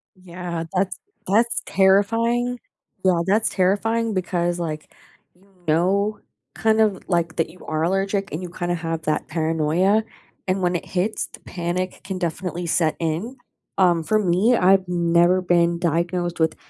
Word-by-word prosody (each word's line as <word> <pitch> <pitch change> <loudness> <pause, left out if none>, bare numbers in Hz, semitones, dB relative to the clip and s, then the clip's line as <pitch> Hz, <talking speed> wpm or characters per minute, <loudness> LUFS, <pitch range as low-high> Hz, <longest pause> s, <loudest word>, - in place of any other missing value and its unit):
Yeah, 175 -2 -6
that's, 190 +1 0 0.3
that's 230 +4 +2
terrifying. 230 +6 +2 0.4
Yeah, 180 -3 +3
that's 215 +3 +2
terrifying 220 +4 +1
because, 175 -2 -1
like, 155 -2 -5 0.4
you 190 +2 -26 0.2
know, 195 +6 +1 0.4
kind 220 0 +2
of, 205 -3 +2
like, 170 -3 0
that 165 -1 0
you 180 +2 -15
are 155 0 -1
allergic 195 +2 0
and 160 - -4
you 175 - -6
kinda 175 0 -2
have 165 -1 -4
that 155 - -1
paranoia 165 +6 +1 0.4
and 185 +1 0
when 180 0 +1
it - - -3
hits, 195 +4 -1
the - - -14
panic 180 +1 -4
can 190 -1 -4
definitely 175 0 -3
set 160 -1 +1
in. 170 +11 -3 0.4
Um, 175 -3 +3
for 215 +5 +2
me, 200 +6 +3
I've 190 -1 +4
never 175 +1 +3
been 170 -1 +2
diagnosed 175 +1 -1
with 160 0 +2
180 Hz, 150 wpm, -22 LUFS, 170-195 Hz, 0.4 s, I've